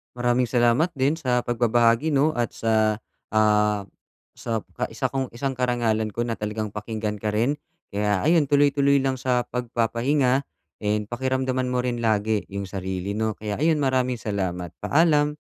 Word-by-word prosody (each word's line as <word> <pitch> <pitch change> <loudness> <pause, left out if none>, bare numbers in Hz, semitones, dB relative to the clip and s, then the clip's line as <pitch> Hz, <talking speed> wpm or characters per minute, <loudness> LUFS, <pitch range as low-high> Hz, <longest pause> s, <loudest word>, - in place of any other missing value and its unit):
Maraming 120 0 +1
salamat 120 +8 +2
din 135 +4 +1
sa 125 -6 0
pagbabahagi, 120 +4 +2
no, 145 +3 +3
at 120 - -1
sa, 110 -1 +2 0.4
ah, 105 -1 +3 0.5
sap 115 -2 -3
ka - - 0
isa - - -1
kong 135 -3 -3
isang 135 +1 -3
karangalan 115 -4 0
ko 120 - -2
na 115 -1 -3
talagang 105 0 -3
pakinggan 105 0 -4
ka 105 +1 -3
rin. 125 +7 +1 0.3
Kaya, 105 -1 0
ayun 160 -2 +4
tuloy-tuloy 140 0 +3
lang 135 -1 0
sa 125 -1 +1
pagpapahinga 125 +3 0 0.4
and 105 0 0
pakiramdaman 130 +1 -1
mo 125 - +1
rin 125 -1 -2
lagi 110 -1 +1
yung 100 -1 -4
sarili, 95 +1 -4
no? 110 0 0
Kaya 105 0 -5
ayun, 155 0 +2
maraming 130 -3 +1
salamat, 90 -4 -3
paalam. 150 -1 +2
120 Hz, 155 wpm, -24 LUFS, 105-130 Hz, 0.5 s, ayun